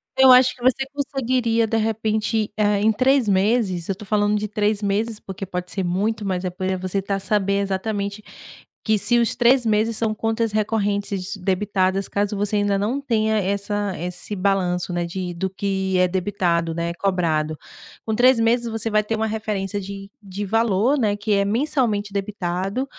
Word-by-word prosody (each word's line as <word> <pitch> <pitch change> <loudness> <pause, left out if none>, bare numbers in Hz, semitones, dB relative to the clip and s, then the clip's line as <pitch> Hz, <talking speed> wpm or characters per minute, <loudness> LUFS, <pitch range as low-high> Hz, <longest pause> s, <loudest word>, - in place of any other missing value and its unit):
Eu 265 -1 +7
acho 255 0 +6
que 245 - -19
você 255 +2 +2
conseguiria, 255 -5 0
de 225 +1 -1
repente, 220 0 0
eh, 210 -2 +2
em 220 +1 +4
3 255 +2 +2
meses. 195 -3 +1
Eu - - +2
estou 200 +3 -11
falando 205 +1 +1
de 210 - -2
3 210 0 0
meses, 210 +2 -1
porque 190 0 -8
pode 180 -1 -5
ser 195 - -2
muito, 205 +5 -1
mas 185 -2 -2
é 185 - 0
porque 185 +1 -2
você 185 +1 -2
está 195 +1 -2
a - - -2
saber 200 0 0
exatamente 200 +1 -3 0.6
que 220 -1 +3
se 235 +4 +2
os 235 -2 +1
3 245 +1 +4
meses 220 +1 +1
são 220 -2 0
contas 225 +1 -1
recorrentes 205 -2 -1
debitadas, 190 0 0
caso 205 +1 -1
você 205 +1 0
ainda 205 -1 +1
não 220 +8 -1
tenha 220 -4 +1
essa 200 0 -1
esse 180 +4 -5
balanço, 185 -2 0
né. 175 0 -1
De 180 +1 -4
do 190 +3 -2
que 190 -1 -1
é 180 - +4
debitado, 175 -3 0
né, 170 0 -2
é - - -3
cobrado. 165 -5 0 0.5
Com 220 - -1
3 250 +1 +5
meses, 235 +1 +2
você 225 0 -3
vai 215 -1 +3
ter 225 +2 -2
uma 220 0 -1
referência 210 -2 -3
de 195 +1 -8
de 200 0 -6
valor, 225 +5 +2
né, 210 -3 +1
que 210 +1 -3
é 200 0 +2
mensalmente 220 -3 0
debitado 195 +3 -2
205 Hz, 185 wpm, -22 LUFS, 190-220 Hz, 0.6 s, Eu